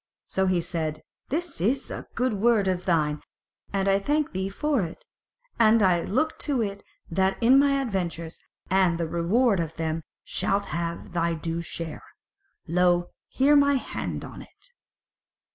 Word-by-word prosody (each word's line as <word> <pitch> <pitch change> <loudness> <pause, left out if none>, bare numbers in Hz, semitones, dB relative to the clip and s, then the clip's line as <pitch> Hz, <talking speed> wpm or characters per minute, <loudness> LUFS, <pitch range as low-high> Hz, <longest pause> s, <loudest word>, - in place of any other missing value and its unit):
So 190 0 0
he 180 -2 +2
said: 160 -3 -3 0.3
"This 335 - -3
is 255 +8 0
a - - -6
good 250 0 +1
word 210 -1 +3
of 185 -1 -1
thine, 150 -4 +1 0.5
and 195 0 0
I 195 0 +4
thank 295 +7 0
thee 190 +1 -2
for 285 +5 0
it; 165 -3 -6 0.5
and 225 0 +6 0.3
look 310 +10 0
to 280 -4 -1
it 200 -1 -4 0.3
that 190 +3 +1
in 250 +3 +6
my 280 -1 +3
adventures, 175 - -3 0.3
and 185 -3 +3
the 165 -1 -1
reward 195 +6 +2
of 165 -1 -3
them 160 -1 -1
thou - - -7 0.2
shalt 200 +1 -1
have 170 +4 -4
thy 170 -1 0
due 165 +1 -3
share. 165 -2 -6 0.7
Lo 175 +1 +2 0.2
here 280 +3 +3
my 280 0 +5
hand 260 - -4
on - - -9
it!" - - -16
190 Hz, 160 wpm, -26 LUFS, 170-240 Hz, 0.7 s, and